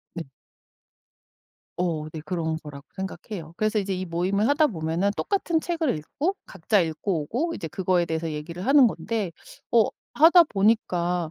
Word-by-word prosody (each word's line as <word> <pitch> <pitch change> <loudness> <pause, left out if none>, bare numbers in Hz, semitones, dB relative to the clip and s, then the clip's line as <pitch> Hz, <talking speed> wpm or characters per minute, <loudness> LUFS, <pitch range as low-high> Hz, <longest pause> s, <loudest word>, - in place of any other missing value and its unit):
네. 165 -2 -4 1.5
어 165 -4 -1
네. 160 - -6
그런 160 -1 -2
거라고 145 -1 -10
생각해요. 190 -3 -6
그래서 215 0 +1
이제 195 -1 -1
이 185 0 -3
모임을 185 +6 0
하다 300 +2 +4
보면은 165 +2 -1
똑같은 350 -5 0
책을 325 - -1
읽고 315 - -2
각자 200 +4 +1
읽고 160 +1 -1
오고 310 - -2
이제 160 - -5
그거에 180 0 +1
대해서 160 0 -3
얘기를 165 +6 -6
하는 275 -2 +7
건데 215 -5 -2 0.4
어 230 -2 +6 0.3
하다 335 +3 +7
보니까 180 - +1
185 Hz, 320 characters per minute, -25 LUFS, 165-230 Hz, 1.5 s, 하는